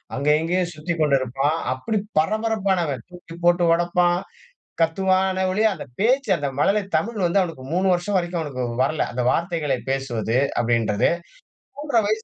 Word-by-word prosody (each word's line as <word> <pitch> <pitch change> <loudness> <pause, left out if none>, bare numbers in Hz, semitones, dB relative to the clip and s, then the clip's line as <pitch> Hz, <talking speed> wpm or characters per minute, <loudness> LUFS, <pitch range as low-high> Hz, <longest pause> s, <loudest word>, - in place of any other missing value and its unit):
அங்கே, 140 +2 +1
இங்கே 180 +3 0
சுத்திக்கொண்டு 155 -3 +1
இருப்பான். 135 +4 0 0.2
அப்பிடி 210 - -2 0.2
பரபரப்பானவன், 190 - 0
தூக்கிப்போட்டு 175 0 0
ஒடப்பான். 175 +1 +2 0.6
கத்துவான்னே 190 +3 +2
ஒழிய, 215 +4 +1
அந்த 165 - -8
பேச்சு 250 +2 +2
அந்த 145 - -2
மழலை 205 +7 +3 0.2
தமிழ் 205 +3 -2
வந்து 175 +3 +2
அவனுக்கு 165 -8 -4
3 190 +2 +1
வருஷம் 190 +3 -1
வரைக்கும் 175 -1 -2
அவனுக்கு 135 -5 -4 0.2
வரல. 155 +3 0
அந்த 125 +1 -2
வார்த்தைகளை 165 -6 -1
பேசுவது 125 -4 -1 0.2
அப்பிடின்றது 115 -3 +2 0.7
3 290 -5 +1
வயசு 220 +1 -1
175 Hz, 135 wpm, -22 LUFS, 140-190 Hz, 0.7 s, மழலை